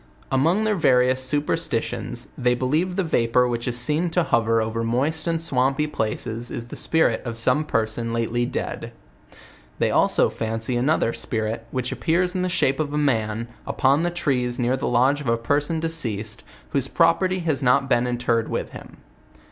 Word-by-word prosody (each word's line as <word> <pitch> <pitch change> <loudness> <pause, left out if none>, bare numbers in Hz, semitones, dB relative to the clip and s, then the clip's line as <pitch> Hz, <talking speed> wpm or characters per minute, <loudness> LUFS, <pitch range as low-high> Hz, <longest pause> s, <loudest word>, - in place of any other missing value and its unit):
Among 165 +10 +2
their 215 -1 +2
various 130 -7 +3
superstitions, 145 -3 -2
they 125 -1 +1
believe 155 +9 0
the 190 - +1
vapor 125 -6 +2
which 120 0 -3
is 120 -1 -1
seen 150 +8 +1
to 175 +1 +1
hover 115 -5 +2
over 110 +1 -2
moist 145 +8 0
and 165 -1 +1
swampy 135 -2 +1
places 115 -3 -3
is 120 0 -5
the - - -7
spirit 160 -9 +1
of 115 -3 -5
some 125 +6 +2
person 115 -1 -1
lately 115 +1 0
dead. - - -5 0.8
They - - +1
also - - +3
fancy 115 +2 -3
another 125 -1 +1
spirit, 115 0 -3
which 130 +1 -3
appears 165 +8 +1
in 185 - -1
the 185 - 0
shape 135 -6 +1
of 150 -1 -2
a - - 0
man, 115 -5 0 0.2
upon 135 +3 +2
the 175 - +1
trees 130 -8 -1
near 125 +1 +1
the 130 - -3
lodge 130 +4 +2
of 140 - -7
a 115 - +2
person 145 +7 0
deceased, 115 -11 -1 0.3
whose - - +1
property 185 +2 +2
has 155 -4 0
not 130 +1 +3
been 125 -2 +2
interred 120 -2 0
with - - -3
him. - - -11
130 Hz, 175 wpm, -23 LUFS, 115-155 Hz, 0.8 s, various